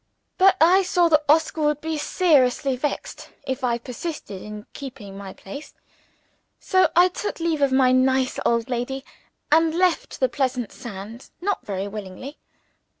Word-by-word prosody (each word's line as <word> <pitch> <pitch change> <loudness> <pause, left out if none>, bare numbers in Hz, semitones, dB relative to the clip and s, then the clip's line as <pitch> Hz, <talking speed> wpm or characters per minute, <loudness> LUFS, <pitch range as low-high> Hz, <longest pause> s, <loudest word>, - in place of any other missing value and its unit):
But 380 0 +6
I 360 +4 +6
saw 355 -2 +2
that 305 -1 +4
Oscar 320 +1 +3
would 300 -1 +1
be 320 +1 -3
seriously 285 -5 +2
vexed 285 +4 -4 0.2
if 265 -1 -3
I 240 -2 +1
persisted 245 - -7
in 210 0 -8
keeping 250 -8 -9
my 195 -1 -8
place. 200 +12 -10 0.8
So 375 0 +3
I 350 +2 +7
took 370 +2 -5
leave 330 -3 -1
of 280 -1 +3
my 260 -1 +4
nice 260 0 +2
old 235 -1 +1
lady, 260 +2 -3 0.5
and 320 +1 +4
left 360 -1 0
the 260 - +3
pleasant 255 -2 -2
sands 225 0 -9
not 400 +2 -2
very 195 -1 -3
willingly. 210 +7 -8
270 Hz, 150 wpm, -23 LUFS, 235-320 Hz, 0.8 s, I